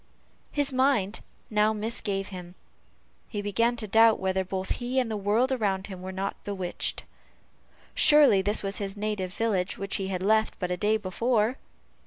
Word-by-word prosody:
His 285 -2 0
mind 255 -6 +1 0.3
now 210 0 +3
misgave 210 -2 -3
him; 180 -2 -9 0.7
he 210 - -5
began 230 +4 +1
to 225 -2 -3
doubt 225 +2 +5
whether 190 0 0
both 190 0 -4
he 245 +2 -2
and 245 -3 -1
the - - -1
world 210 +6 +1
around 200 -6 0
him 190 -3 -9
were 185 +1 -6
not 195 +1 -4
bewitched. 190 -3 -3 0.9
Surely 295 -10 +6
this 205 +3 0
was 195 0 -2
his 200 0 -4
native 205 -3 -3
village, 195 -3 -1
which 195 0 0
he 195 - -3
had 185 -1 -3
left 220 +2 +2
but 180 -1 -3
a - - +1
day 210 +4 +2
before. 220 +4 0
205 Hz, 170 wpm, -27 LUFS, 190-225 Hz, 0.9 s, Surely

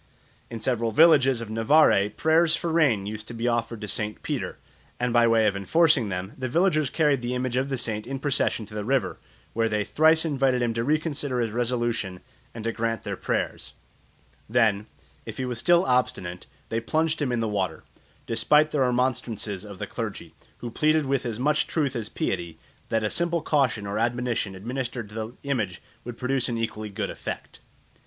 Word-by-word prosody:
In 115 -2 -6
several 115 -1 0
villages 135 -5 +5
of 110 -2 -6
Navarre 115 -3 +4
prayers 160 +5 +3
for 170 - -3
rain 140 -12 +3
used 110 +1 -6
to 120 - -7
be 115 +1 -2
offered 115 -1 -1
to 105 - -5
St. 105 +1 -1
Peter, - - -3 0.4
and 125 -1 0
by 120 -1 +5
way 115 -1 +4
of 100 -2 +2
enforcing 140 - +3
them 95 +2 -4
the 130 -1 -4
villagers 155 -2 +2
carried 150 -5 +2
the 120 +1 -2
image 125 -1 -2
of 130 +2 0
the 135 - -1
saint 110 -2 -3
in 135 +1 -3
procession 135 -5 0
to 105 - -14
the 105 -1 -3
river, 135 +4 0 0.3
where 115 0 +1
they 105 -1 0
thrice 160 +8 +4
invited 135 -4 +1
him 115 -1 0
to 115 0 -1
reconsider 145 -2 -1
his 115 -2 0
resolution 120 -5 -1 0.3
and 115 - -8
to 115 - 0
grant 115 0 -2
their - - -3
prayers; - - -3 0.8
then, 110 -3 +2 0.4
if - - -7
he 130 - -2
was 125 -2 -4
still 175 +6 +4
obstinate, 105 -8 -1 0.2
they 115 - 0
plunged 155 +6 0
him 135 -4 0
in 120 - 0
the 115 - 0
water, 95 -6 -2 0.4
despite 150 +7 +3
the 150 - 0
remonstrances 120 -6 0
of 100 -2 -9
the - - -4
clergy, - - -6 0.3
who 120 - -5
pleaded 155 +3 +2
with 135 -2 0
as 115 -1 -4
much 150 +3 +2
truth 140 -5 -1
as 110 -3 -3
piety 85 -3 -3 0.3
that 115 -1 +1
a 110 - +1
simple 170 -1 0
caution 130 -8 +1
or 100 +2 -2
admonition 120 -4 -1
administered 120 +2 -4
to - - -14
the 110 +1 -5
image 110 -11 -2 0.2
would 120 -1 -7
produce 130 0 0
an 115 - -2
equally 110 -2 -3
good 100 0 -3
effect. - - -7
120 Hz, 190 wpm, -25 LUFS, 110-135 Hz, 0.8 s, villages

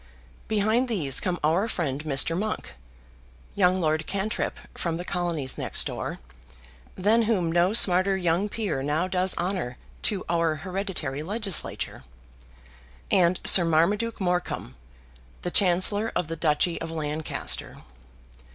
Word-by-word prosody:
Behind 220 +4 +1
these 160 - +2
come 175 -2 -2
our 170 +8 +2
friend 150 -9 -2
Mr. 155 +2 +1
Monk, 210 - -3 0.8
young 185 -1 +3
Lord 155 -2 0
Cantrip 200 +2 -2 0.2
from 165 -1 -3
the 175 - -6
colonies 170 -8 -1
next - - +1
door, - - -4 0.8
than 215 +5 +3
whom 180 -7 +1
no 175 +4 +2
smarter 190 -3 +6
young 180 +3 0
peer 205 -11 -3
now 150 +6 0
does 185 0 +1
honour 175 -9 -3 0.2
to 200 -3 -1
our 165 -2 +1
hereditary 175 -4 -4
legislature, 200 +2 -2 1.1
and 180 0 +3
Sir 180 - +7
Marmaduke 200 +8 +1
Morecombe, 180 - -2 0.7
the 175 - -2
Chancellor 200 +4 +2
of 160 - -1
the 165 - -3
Duchy 165 +2 +1
of 165 - -4
Lancaster. 155 -1 -4
175 Hz, 125 wpm, -26 LUFS, 160-195 Hz, 1.1 s, Sir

